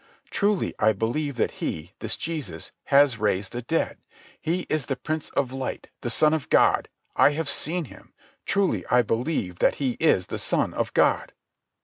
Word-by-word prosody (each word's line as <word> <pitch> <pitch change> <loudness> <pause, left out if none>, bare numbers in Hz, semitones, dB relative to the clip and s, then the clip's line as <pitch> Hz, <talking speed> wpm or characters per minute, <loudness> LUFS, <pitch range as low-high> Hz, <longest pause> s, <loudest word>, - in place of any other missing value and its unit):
"Truly 205 -2 +1
I 110 +1 +4
believe 130 +7 -2
that 120 - 0
He, 80 +3 -3
this 110 - -3
Jesus, 145 - -5
has 140 -4 +4
raised 100 -2 0
the 120 - -4
dead. 165 +7 -1 0.4
He 175 +3 0
is 155 -5 -2
the 135 - -1
Prince 155 +4 -4
of 130 -2 +1
Light, 135 -1 -5
the 120 - -2
Son 155 +5 +4
of 155 -4 -2
God. - - +4 0.3
I 145 - +5
have 160 0 -2
seen 165 +4 0
Him. - - -15 0.4
Truly 200 -2 +1
I 120 +2 +4
believe 115 - -2
that - - +3
He 130 -4 -2
is 125 - +3
the - - -5
Son - - 0
of - - -2
God." - - +2
135 Hz, 175 wpm, -25 LUFS, 115-155 Hz, 0.4 s, I